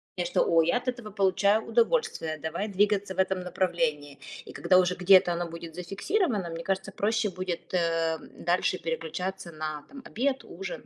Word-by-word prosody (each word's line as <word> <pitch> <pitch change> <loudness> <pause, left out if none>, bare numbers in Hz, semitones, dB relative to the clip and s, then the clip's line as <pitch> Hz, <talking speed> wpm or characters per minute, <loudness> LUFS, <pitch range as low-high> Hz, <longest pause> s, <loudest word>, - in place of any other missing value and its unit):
мне 180 - -2
что: - - +2
"Ой, 165 -1 +3
я 210 - +3
от 250 - -7
этого 240 -4 -3
получаю 200 +2 +2
удовольствие, 460 - +1
давай 160 +7 -3
двигаться 200 -1 +1
в - - -7
этом 190 0 +2
направлении". 165 -6 -1 0.3
И - - -11
когда 185 - +3
уже 180 0 +3
где-то 180 -1 +5
оно 170 0 -3
будет 165 0 -8
зафиксировано, 200 - -1
мне 165 0 -5
кажется, 195 +1 -2
проще 220 +2 0
будет, 185 -1 -5
э, 165 -2 +1
дальше 175 +4 -1
переключаться 170 +3 -4
на, 155 -2 -5
там, 275 -1 -11
обед, 265 +3 -1
ужин. 190 +1 -7
185 Hz, 170 wpm, -28 LUFS, 165-205 Hz, 0.3 s, где-то